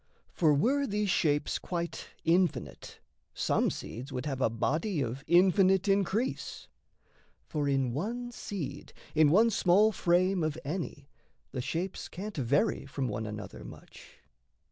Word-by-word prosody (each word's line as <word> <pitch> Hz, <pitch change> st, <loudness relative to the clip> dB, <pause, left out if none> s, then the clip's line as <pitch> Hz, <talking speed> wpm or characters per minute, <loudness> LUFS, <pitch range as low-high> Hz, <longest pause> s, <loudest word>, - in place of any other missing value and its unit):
For 160 Hz, -3 st, +3 dB
were 265 Hz, -, +2 dB
these 205 Hz, -1 st, 0 dB
shapes 145 Hz, -4 st, +1 dB
quite 170 Hz, -1 st, -4 dB, 0.2 s
infinite, 175 Hz, +2 st, 0 dB, 0.4 s
some -, -, +1 dB
seeds 130 Hz, +5 st, -7 dB
Would 125 Hz, 0 st, -4 dB
have 135 Hz, -3 st, -3 dB
a 115 Hz, -, +3 dB
body 155 Hz, -, -1 dB
of 130 Hz, +1 st, -3 dB
infinite 190 Hz, +2 st, +4 dB
increase. 200 Hz, +5 st, 0 dB, 0.8 s
For 145 Hz, -2 st, -1 dB
in 135 Hz, -3 st, +1 dB
one 240 Hz, -, -3 dB
seed, 160 Hz, -, -6 dB, 0.2 s
in 155 Hz, -1 st, +5 dB
one 220 Hz, +8 st, +5 dB
small 200 Hz, +3 st, +4 dB
frame 180 Hz, 0 st, +2 dB
of 155 Hz, 0 st, -1 dB
any, 150 Hz, -3 st, -4 dB, 0.4 s
The 130 Hz, -, -3 dB
shapes 175 Hz, +8 st, -3 dB
can't 205 Hz, +4 st, -7 dB
vary 140 Hz, +1 st, +1 dB
from 135 Hz, -2 st, -3 dB
one 110 Hz, +1 st, -3 dB
another 105 Hz, -1 st, -7 dB
much. -, -, -13 dB
170 Hz, 135 wpm, -30 LUFS, 140-195 Hz, 0.8 s, in